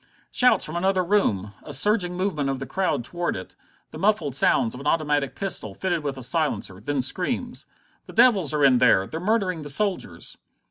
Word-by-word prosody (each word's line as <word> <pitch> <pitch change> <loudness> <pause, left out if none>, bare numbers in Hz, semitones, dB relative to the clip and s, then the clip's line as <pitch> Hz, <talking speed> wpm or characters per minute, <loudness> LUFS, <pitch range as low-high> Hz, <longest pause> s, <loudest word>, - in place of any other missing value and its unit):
Shouts 250 -1 +3
from 155 - -7
another 185 +1 +1
room! 105 - 0
A - - -10
surging 180 +4 +1
movement 180 -7 -1
of 135 - -1
the 135 - -6
crowd 155 -6 -1
toward 175 +5 -3
it. 95 - -9 0.4
The - - -9
muffled 180 -8 +1
sounds 115 -4 +2
of 125 - -8
an 140 - -5
automatic 150 -4 0
pistol, 145 - -3
fitted 175 - -2
with 140 -2 -3
a 130 - -6
silencer! 145 - -1
Then 135 +4 -2
screams: 240 - -3 0.4
"The - - -11
devils 220 -10 +4
are 150 -2 +2
in 130 -2 +5
there! 105 -6 +4
They're 160 - -6
murdering 185 -3 0
the 145 - -5
soldiers!" 165 - -2
155 Hz, 190 wpm, -24 LUFS, 135-190 Hz, 0.4 s, in